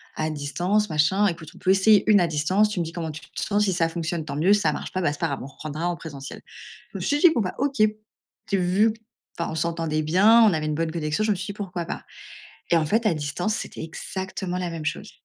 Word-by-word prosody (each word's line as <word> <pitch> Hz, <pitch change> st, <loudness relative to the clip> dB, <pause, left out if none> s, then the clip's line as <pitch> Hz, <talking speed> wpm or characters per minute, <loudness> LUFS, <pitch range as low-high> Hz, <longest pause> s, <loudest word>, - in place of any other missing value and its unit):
à 155 Hz, 0 st, -1 dB
distance, 175 Hz, +8 st, 0 dB
machin, 160 Hz, +7 st, +3 dB
écoute, 165 Hz, -4 st, -4 dB
on -, -, -14 dB
peut 185 Hz, -, -1 dB
essayer 195 Hz, +2 st, +5 dB
1 205 Hz, -, +7 dB
à 175 Hz, -, +3 dB
distance. 170 Hz, +7 st, +2 dB
Tu 210 Hz, -3 st, -3 dB
me 170 Hz, -, 0 dB
dis 160 Hz, -, -6 dB
comment 165 Hz, -2 st, -4 dB
tu 155 Hz, +1 st, -9 dB
te -, -, -8 dB
sens. 205 Hz, 0 st, +1 dB
Si 190 Hz, -, +1 dB
ça 165 Hz, -2 st, +2 dB
fonctionne, 165 Hz, -1 st, -3 dB
tant 140 Hz, -, -5 dB
mieux. 175 Hz, +7 st, +4 dB
Si 210 Hz, -, +3 dB
ça -, -, +2 dB
marche -, -, -6 dB
pas, 185 Hz, -, -2 dB
bah, 160 Hz, -, +2 dB
c'est 145 Hz, -, -10 dB
pas 165 Hz, -, +1 dB
grave, 140 Hz, -3 st, -3 dB
on -, -, -6 dB
reprendra 155 Hz, +4 st, -5 dB
en 175 Hz, -, -1 dB
présentiel». 145 Hz, -4 st, -9 dB, 0.5 s
Je -, -, -5 dB
me -, -, -8 dB
suis 290 Hz, -, +1 dB
dit: 350 Hz, -, +8 dB
«Bon, 235 Hz, -, +1 dB
bah, 185 Hz, -, -2 dB
OK», 275 Hz, -2 st, -1 dB, 0.7 s
tu 200 Hz, -, +1 dB
vu 190 Hz, +5 st, +3 dB, 0.5 s
enfin 170 Hz, -, -2 dB
on -, -, -4 dB
s'entendait 160 Hz, -1 st, -1 dB
bien. 205 Hz, +9 st, +5 dB
On 215 Hz, -, +6 dB
avait 155 Hz, -2 st, -1 dB
une 155 Hz, -, -1 dB
bonne 160 Hz, +1 st, -1 dB
connexion. 155 Hz, +4 st, -1 dB
Je 215 Hz, -, +1 dB
me 205 Hz, -, +2 dB
suis 180 Hz, +1 st, -5 dB
dit: 200 Hz, -, -4 dB
«Pourquoi 180 Hz, -4 st, -5 dB
pas?» -, -, -6 dB, 0.7 s
et 170 Hz, -, +6 dB
en 160 Hz, -, +1 dB
fait, 220 Hz, +9 st, +1 dB
à 185 Hz, -, +3 dB
distance, 155 Hz, +8 st, -2 dB
c'était -, -, -6 dB
exactement 185 Hz, +2 st, -5 dB
la 180 Hz, -, -2 dB
même 165 Hz, -2 st, -6 dB
chose. 155 Hz, -, -4 dB
175 Hz, 270 wpm, -24 LUFS, 155-200 Hz, 0.7 s, dit